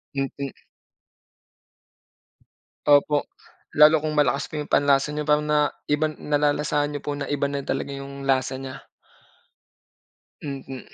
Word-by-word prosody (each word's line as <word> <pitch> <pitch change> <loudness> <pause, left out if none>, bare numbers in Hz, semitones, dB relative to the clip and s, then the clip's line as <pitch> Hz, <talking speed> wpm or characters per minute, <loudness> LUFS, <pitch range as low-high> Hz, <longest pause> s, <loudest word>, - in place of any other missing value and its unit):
Mm. 135 0 -3 2.3
Opo. 145 0 +4 0.5
Lalo 150 0 +7
kung 155 -1 -2
malakas 140 -5 +2
pa 155 - -6
yung 150 - -3
panlasa 140 +1 +3
niyo 150 - -2
parang 150 0 +2
na 150 0 +2 0.3
iba 155 +1 +1
nalalasahan 145 0 0
niyo 145 - -5
po 145 - -1
na 140 -1 -5
iba 145 -1 0
na 140 0 -3
talaga 135 +1 -3
yung 140 0 -7
lasa 130 -1 +1
niya. 135 0 -8 1.6
Hmm. 135 -2 -6
145 Hz, 125 wpm, -24 LUFS, 140-150 Hz, 2.3 s, Lalo